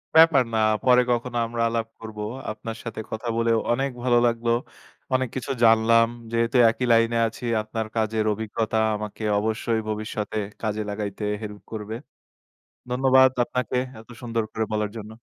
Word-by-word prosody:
ব্যাপার 160 -4 +7
না। 110 - +2 0.2
পরে 125 -1 +6
কখনো 120 0 -1
আমরা 115 0 -3
আলাপ 115 -1 -1
করব। 110 -1 -9 0.3
আপনার 110 +1 -7
সাথে 115 -2 -6
কথা 110 +2 -4
বলেও 115 -1 +2
অনেক 135 +3 +1
ভালো 125 -1 +4
লাগলো। 115 0 0 0.6
অনেক 130 -1 +1
কিছু 130 +1 -3
জানলাম। 115 0 +5 0.2
যেহেতু 115 +2 +1
একই 120 +3 -1
লাইনে 115 0 +3
আছি 115 +2 -8 0.2
আপনার 110 +1 -4
কাজের 110 -1 0
অভিজ্ঞতা 110 +1 -2 0.2
আমাকে 105 +1 -6 0.2
অবশ্যই 110 +1 -1
ভবিষ্যতে 110 0 -3 0.2
কাজে 110 -1 -1
লাগাইতে 105 0 -4 0.2
হেল্প 105 -1 -7
করবে। 110 0 -5 0.9
ধন্যবাদ 130 +1 +5
আপনাকে 125 0 -2 0.2
এত 110 - -16
সুন্দর 115 -2 -1
করে 110 - -1
বলার 105 -1 -1
জন্য। 110 0 -8
115 Hz, 150 wpm, -24 LUFS, 110-120 Hz, 0.9 s, ব্যাপার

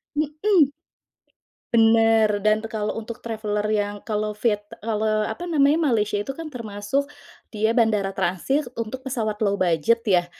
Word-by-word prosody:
Mhm. 305 +1 +2 1.0
Bener 225 -2 +4
dan 215 +2 +2
kalau 215 -1 -3
untuk 230 +2 -7
traveler 215 -2 -2
yang 205 -1 0
kalau 215 -1 -2
viet 210 -1 0 0.2
kalau 215 -1 0
apa 345 +11 -4
namanya, 300 -2 +3 0.2
Malaysia 210 -1 +1
itu 240 +7 -3
kan 325 +1 -7
termasuk 230 +2 -3 0.5
dia 220 +3 0
bandara 210 -4 +2
transit 195 - -1
untuk 245 +4 -5
pesawat 220 -5 -2
low 200 - +2
budget 185 +5 +2
ya, 185 -6 +2
220 Hz, 140 wpm, -23 LUFS, 210-245 Hz, 1.0 s, Bener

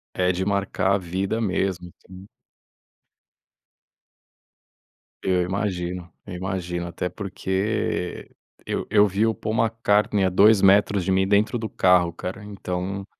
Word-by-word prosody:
É 90 0 +2
de 95 +1 -2
marcar 100 -1 0
a - - +2
vida 95 +4 -2
mesmo, 95 -3 -2 0.2
então. 95 +1 -12 3.0
Eu 90 -1 +2
imagino, 90 -2 -3 0.2
eu 95 - -6
imagino, 90 -1 -3
até 85 +1 -4
porque 95 0 -3 0.4
eu - - -3
eu 105 -1 +5
vi 100 +3 +1
o 115 - +1
Paul 110 0 -4
McCartney 105 -3 +1
a 95 - +3
2 100 +3 +5
metros 100 0 +4
de 95 - -1
mim, 95 0 +2
dentro 105 +4 +2
do 110 -1 -4
carro, 90 -2 +3
cara, 90 +4 -6
então 95 -1 -5
95 Hz, 130 wpm, -23 LUFS, 90-105 Hz, 3.0 s, eu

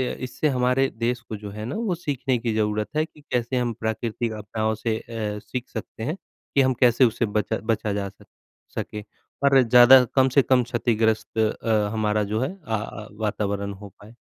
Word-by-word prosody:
अ, - - -13
इससे 130 +4 -1
हमारे 125 +2 +2
देश 120 +2 0
को 115 -2 -7
जो 105 0 -8
है 105 +1 -6
ना, 125 - -4
वो 220 -5 -1
सीखने 135 -6 -1
की 115 -1 -1
ज़रूरत 105 -1 0
है 155 +1 +2
कि 155 -2 -20
कैसे 125 +1 0
हम 120 -2 0
प्राकृतिक 110 +1 -2
आपदाओं 110 +1 -2
से 110 0 -1
अ, 110 -3 -4
सीख 125 +4 -6
सकते 110 0 -7
हैं, 150 +8 -2 0.4
कि 140 - +6
हम 130 0 +3
कैसे 125 +1 +6
उसे 115 +1 +1
बचा 105 -1 -1
बचा 105 -2 -1
जा 100 -1 -2
सक - - -20 0.5
सके 105 - -4 0.4
और 135 -1 +6
ज़्यादा 125 +2 +8
कम 130 -1 +5
से - - +9
कम 130 -1 +3
क्षतिग्रस्त 115 -2 0
अ, 110 -1 +1
हमारा 105 -1 +1
जो 110 - +1
है 135 +7 -1
अ 150 -12 -7
अ, 105 0 -6
वातावरण 100 -2 -2
हो 100 - -9
पाए। 110 +3 -15
115 Hz, 195 wpm, -24 LUFS, 105-125 Hz, 0.5 s, से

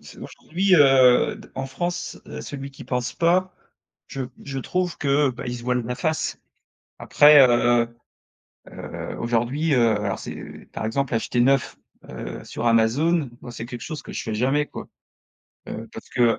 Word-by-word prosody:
c'est - - -14
aujourd'hui 185 +3 0
heu, 135 -4 +5
d - - -14
en 135 0 -3
France, 175 +7 -4
heu, - - -7
celui 140 -1 -7
qui 135 - -12
pense 125 -1 -2
pas, 180 +2 +2 0.5
je 135 - -5 0.2
je 135 -1 -4
trouve 180 +6 -2
que, 140 0 +2
bah, 125 - -8
il 125 - -3
se 120 - -9
voile 125 0 0
la 125 - -2
face 155 +4 -2 0.6
après, 150 0 +7
heu 120 0 +3 0.8
heu, - - -7
aujourd'hui, 120 +7 0
heu, 115 -4 +3
alors 100 -2 -2
c'est, - - -9
par - - -4
exemple, 130 +2 -1
acheter 120 +2 0
neuf, 125 -3 +2 0.3
heu, - - -7
sur 120 - -3
Amazon, 130 +6 +2
moi 120 - -9
c'est 115 -1 -7
quelque 120 0 -8
chose 155 -2 -6
que - - -9
je - - -3
fais 110 -2 -4
jamais, 135 +6 +1
quoi. - - -9 0.8
Heu, 115 +1 -6
parce - - -10
que 120 -2 +2
130 Hz, 170 wpm, -23 LUFS, 120-150 Hz, 0.8 s, après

